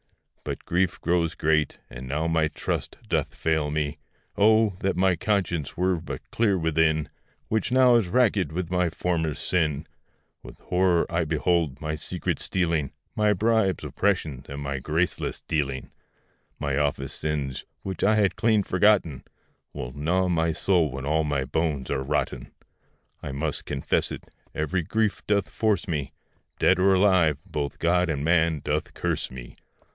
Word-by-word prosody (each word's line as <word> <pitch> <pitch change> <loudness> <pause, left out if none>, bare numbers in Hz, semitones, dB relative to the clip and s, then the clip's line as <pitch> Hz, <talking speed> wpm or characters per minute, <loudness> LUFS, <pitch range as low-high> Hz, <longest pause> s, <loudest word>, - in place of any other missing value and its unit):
But - - -5
grief 90 +1 0
grows 85 -1 +1
great, 75 -2 +1
and 65 +1 -9
now 75 +5 -1
my 80 -1 +2
trust 75 - -4
doth - - -1
fail 80 -2 0
me. 75 0 -2 0.4
Oh! 110 +1 +4
that 95 - 0
my 95 0 +3
conscience 85 -6 -1
were 90 0 +2
but 85 - -8
clear 105 -4 +2
within, 80 -2 +1 0.4
Which 110 +2 -1
now 130 -1 +6
is 115 -6 +3
rackèd 105 - +2
with 85 +1 -4
my 90 -1 +2
former 80 -2 -1
sin; 80 -4 0 0.6
With - - -12
horror 90 -2 +2
I 85 0 +1
behold 80 -2 0
my 80 0 -3
secret 75 - -3
stealing, 85 -6 0 0.2
My 105 -1 +3
bribes, 110 -2 +1
oppression, 80 -10 -1
and 70 +1 -6
my 70 -1 -3
graceless 80 +5 -1
dealing; 70 -4 -2 0.7
My 70 -2 -1
office 70 -2 -1
sins, 70 -4 -3 0.2
which 95 -3 -4
I 110 - +4
had 100 -4 +2
clean 110 -3 +2
forgotten, 90 -7 +2 0.5
Will 60 0 -6
gnaw 85 +6 +1
my 85 -2 +1
soul 85 -1 +2
when 70 +1 -6
all 80 +2 +2
my 75 -3 0
bones 75 -1 -1
are 65 - 0
rotten: 75 +3 -2 0.7
I - - -5
must 70 +2 -2
confess 70 -2 0
it, - - -7 0.3
very 80 +4 0
grief 110 +5 0
doth 100 -2 +2
force 105 -5 0
me, 75 -5 -2 0.5
Dead 95 - +3
or 95 +1 +5
alive, 95 -6 +4
both 75 -6 -4
God 90 +1 +2
and 75 -2 -1
man 80 -2 +2
doth - - -2
curse - - -1
me. - - -10
80 Hz, 155 wpm, -26 LUFS, 75-95 Hz, 0.7 s, now